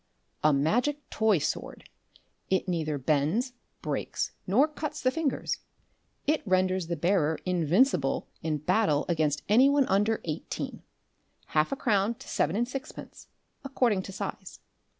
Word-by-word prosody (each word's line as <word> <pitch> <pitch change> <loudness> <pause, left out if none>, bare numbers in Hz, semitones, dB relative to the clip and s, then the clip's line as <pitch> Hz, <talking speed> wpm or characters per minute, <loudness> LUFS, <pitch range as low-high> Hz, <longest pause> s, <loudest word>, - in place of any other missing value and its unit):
"A 155 - +6
Magic 245 - +1
Toy 220 -3 +3
Sword. 150 - -4 0.6
It 190 0 +1
neither 160 -4 -1
bends, 155 - +1 0.3
breaks, - - -2 0.2
nor 245 +11 +4
cuts 305 -1 -5
the 255 - +2
fingers. 315 -1 -1 0.7
It 305 +1 +2
renders 185 -2 +1
the 170 - -1
bearer 160 -2 +1
invincible 180 - +2
in 155 -1 -1
battle 155 -1 +2
against 155 -3 0
any 245 +7 +6
one 285 -1 +3
under 210 +3 +2
eighteen. 155 -2 -4 0.7
Half 155 0 +2
a - - 0
crown 215 -3 +1
to 265 +3 -14
seven 160 +5 0
and 240 +3 +1
sixpence, 265 +1 -8 0.4
according 250 -7 +1
to 195 - -8
size. - - -6
190 Hz, 135 wpm, -28 LUFS, 160-255 Hz, 0.7 s, A